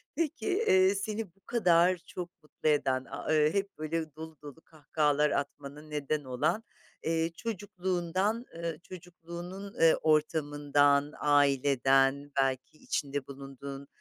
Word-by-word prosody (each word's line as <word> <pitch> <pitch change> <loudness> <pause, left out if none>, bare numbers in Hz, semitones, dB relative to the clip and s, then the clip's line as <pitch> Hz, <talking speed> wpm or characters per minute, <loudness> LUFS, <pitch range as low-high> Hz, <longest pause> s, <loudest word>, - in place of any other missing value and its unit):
Peki, 325 -2 -2
eee, 200 - +4
seni 215 +2 -3
bu - - -30
kadar 180 -5 +4
çok 180 -1 -6
mutlu 155 0 -2
eden, 130 -3 +1
aaa, - - -8
ııı, 155 -1 +4
hep 200 -3 -2
böyle 155 -1 -3
dolu 160 0 -9
dolu 145 +2 -11
kahkahalar 150 -2 0
atmana 140 +1 -4
neden 150 -1 -3
olan, 130 - 0 0.4
eee, 165 0 0
çocukluğundan, 190 0 -2
ııı, 165 -2 -4
çocukluğunun, 180 +2 -9
eee, 165 -1 +7
ortamından, 145 -2 +2
aileden, 140 -1 +3
belki 130 +2 -2
içinde 140 -2 -3
bulunduğun, 140 0 -8
155 Hz, 120 wpm, -30 LUFS, 145-180 Hz, 0.4 s, eee